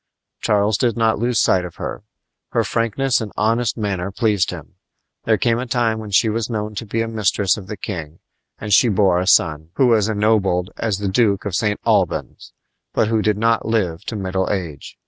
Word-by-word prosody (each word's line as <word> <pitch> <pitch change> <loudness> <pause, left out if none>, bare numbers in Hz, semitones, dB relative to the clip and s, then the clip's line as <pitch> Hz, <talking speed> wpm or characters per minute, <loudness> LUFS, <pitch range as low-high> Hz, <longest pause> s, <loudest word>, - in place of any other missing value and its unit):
Charles 105 0 +1
did 120 -3 +1
not 110 -2 +2
lose 120 +1 +1
sight 90 -1 +3
of 90 -2 -8
her. - - -5 0.5
Her - - +2
frankness 120 +3 0
and 105 -2 -5
honest 115 +2 +1
manner 100 -4 -2
pleased 105 -2 +1
him. - - -9 0.5
There 110 -1 +3
came 115 -1 +1
a 130 - -4
time 115 -2 0
when 110 -1 -7
she 100 +3 +3
was 110 +1 -1
known 105 -2 -3
to 105 +2 -6
be 115 +2 -1
a - - -4
mistress 105 -3 +1
of 100 -4 -9
the 105 - -6
king, 80 -5 -6 0.4
and 105 -1 -2
she 120 +4 +5
bore 95 -3 +3
a 90 - -2
son, 80 -4 +3
who 135 - +3
was 110 -3 +3
ennobled 105 -4 +1
as 110 -4 -1
the 100 0 -3
Duke 100 0 +1
of 100 - -3
St. 105 +2 0
Albans, - - 0 0.4
but 110 - +1
who 110 -1 +1
did 105 -1 +1
not 115 +1 +1
live 95 -6 -1
to 115 - -4
middle 95 -2 -2
age. 85 -8 -5
105 Hz, 205 wpm, -20 LUFS, 95-115 Hz, 0.5 s, she